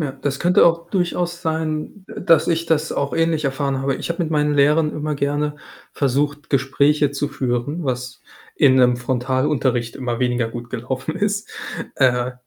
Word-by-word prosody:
Ja, 150 -3 -1
das 140 +1 -4
könnte 180 +1 +5
auch 170 0 +1
durchaus 175 -2 -1
sein, 160 +4 -3
d - - -10
dass 165 -2 +5
ich 165 0 0
das 160 -1 +1
auch 140 0 -2
ähnlich 165 -2 +1
erfahren 135 0 -1
habe. 135 0 0
Ich - - -5
habe 170 +1 -1
mit 160 - -4
meinen 150 -1 +2
Lehrern 150 +2 +3
immer 150 0 -3
gerne 145 +1 -1 0.4
versucht, 145 +2 -1
Gespräche 140 +2 +2
zu 140 +1 -2
führen, 140 +3 -2
was 125 0 -4 0.4
in 140 -3 +5
'nem 125 -1 +4
Frontalunterricht 130 0 0
immer 120 -3 -3
weniger 125 -2 0
gut 120 +1 -8
gelaufen 125 +2 -4
ist. 205 +1 -1 0.5
Äh, 125 -1 +2
145 Hz, 170 wpm, -21 LUFS, 130-160 Hz, 0.5 s, könnte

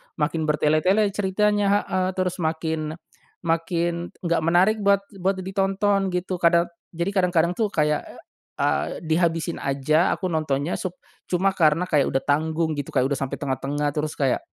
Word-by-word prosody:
makin 155 +1 -1
bertele-tele 155 +8 +2
ceritanya 205 +1 +1
heeh, 185 -1 -1
terus 185 -1 -1
makin, 160 -1 -2 0.5
makin, 170 +1 -1
nggak 170 -1 +1
menarik 180 +6 +3
buat 200 -1 +3 0.2
buat 190 +2 +1
ditonton 195 +1 +1
gitu. 180 0 -2
Kada 170 0 +3 0.2
jadi 170 +4 -1
kadang-kadang 175 -3 +2
tuh 215 +4 0
kayak, 150 -6 0 0.5
a - - 0
dihabisin 165 0 0
aja 140 +5 +1
aku 185 - -2
nontonnya 155 -2 -1
sup 185 - -3 0.4
cuma 190 +2 +2
karena 165 +1 +3
kayak 145 -5 +2
udah 135 - +2
tanggung 160 +3 0
gitu 145 -1 -5
kayak 130 -1 +2
udah 140 - -1
sampai 135 -1 -4
tengah-tengah 145 +1 -2
terus 150 0 -1
kayak, 135 -3 +1
170 Hz, 150 wpm, -24 LUFS, 155-190 Hz, 0.5 s, menarik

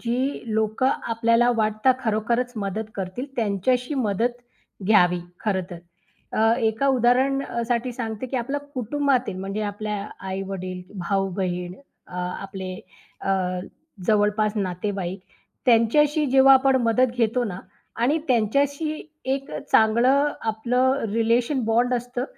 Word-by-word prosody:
जी 255 +4 -1
लोकं 220 +4 +1 0.2
आपल्याला 230 +1 +3
वाटतं 215 +4 +2
खरोखरच 235 +2 0
मदत 210 +2 -3
करतील, 190 +6 -4
त्यांच्याशी 245 - 0
मदत 230 -1 0 0.5
घ्यावी, 180 -4 +4 0.2
खरं 195 -4 0
तर. 175 - -7 0.5
अ, 225 +1 +3 0.2
एका 225 +6 -1
उदाहरण 260 +1 +3
अ, 235 -3 -3
साठी 240 +1 0
सांगते, 230 0 -4
की 260 - -3
आपल्या 275 +4 -2
कुटुंबातील, 255 -3 0
म्हणजे 195 +3 -3
आपल्या 210 -1 -4 0.2
आई-वडील, 190 -1 -4 0.3
भाऊ-बहीण 185 -2 -1 0.3
अ, - - -16
आपले 185 +1 -5 0.5
अ, - - -5 0.8
जवळपास 210 0 +2
नातेवाईक 190 -1 -3 0.5
त्यांच्याशी 290 +6 +4
जेव्हा 270 +1 +6
आपण 265 0 +4
मदत 235 +2 +3
घेतो 240 +1 +1
ना, 190 -3 -5 0.4
आणि 265 +8 +2
त्यांच्याशी 280 +6 +1 0.3
एक 270 +1 -2
अ, - - -4
चांगलं 250 +7 +4 0.2
आपलं 250 +4 +1
रिलेशन 235 +3 +1
बॉन्ड 240 +3 +2
असतं. 245 +1 -3
230 Hz, 120 wpm, -24 LUFS, 205-255 Hz, 0.8 s, जेव्हा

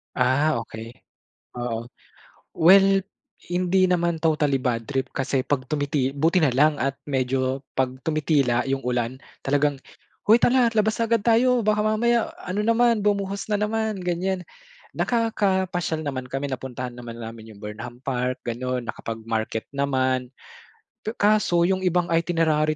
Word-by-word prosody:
Ah, 130 +2 +2
okey. 115 0 -8 0.7
Oo. 115 -1 -3 0.8
Well, 195 +3 +6 0.4
hindi 185 +2 +2
naman 170 -2 +1
totally 150 -4 +1
bad 120 -2 -1
trip 135 -1 -1
kasi 135 -1 -1
pag 140 -3 0
tumiti 145 -2 0
buti 160 +5 +2
na 135 - +3
lang 150 +4 +4
at 135 +1 -2
medyo 130 0 0 0.2
pag 130 -1 +1
tumitila 145 -6 +1
'yung 135 0 -1
ulan 125 0 -1 0.3
talagang, 145 0 +2 0.5
"Hoy, 225 +3 +6
tara 250 -1 +4
labas 215 +1 +2
agad 230 -2 +1
tayo 240 +1 +3
baka 210 0 +2
mamaya 235 +2 +1
ano 205 +4 -2
naman 230 0 +4
bumuhos 200 -1 -1
na 210 -1 +1
naman", 215 -2 -1
ganiyan. 180 +1 -1 0.6
Nakakapasyal 190 -8 0
naman 130 -3 -4
kami, 135 +2 -4
napuntahan 125 -1 -5
naman 115 -1 -8
namin 110 -1 -9
'yung 100 - -17
Burnham 120 +4 -8
Park 125 -1 -2
ganon, 125 +1 -3
nakapagmarket 110 0 -4
naman. 130 -2 0 0.7
Pe 220 +2 -4
kaso 205 -5 +3
'yung 190 +1 +2
ibang 175 -1 +1
itinerary 160 -2 +2
150 Hz, 135 wpm, -24 LUFS, 130-190 Hz, 0.8 s, Well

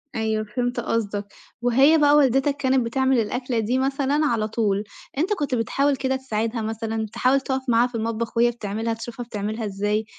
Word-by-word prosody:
أيوه، 220 -1 0
فهمت 245 +3 -2
قصدك. 210 -3 -2 0.4
وهي 265 +6 +5
بقى 295 -1 +5
والدتك 275 0 +3
كانت 260 -3 +2
بتعمل 265 +1 +2
الأكلة 245 +2 -1
دي 225 +4 0
مثلًا 270 +2 0
على 225 -6 +1
طُول، 210 -2 0 0.3
أنت 355 +8 +1
كنت 290 -9 -1
بتحاول 275 +5 +1
كده 265 0 -1
تساعدها 230 -3 -2
مثلًا؟ 220 0 -3
تحاول 265 +2 +2
تقف 265 -1 -2
معاها 235 +1 +4
في 245 - -11
المطبخ 230 +1 -3
وهي 240 +1 +4
بتعملها، 225 0 -3
تشوفها 235 +2 -7
بتعملها 215 0 -4
إزاي؟ 205 +2 -1
235 Hz, 170 wpm, -23 LUFS, 220-265 Hz, 0.4 s, وهي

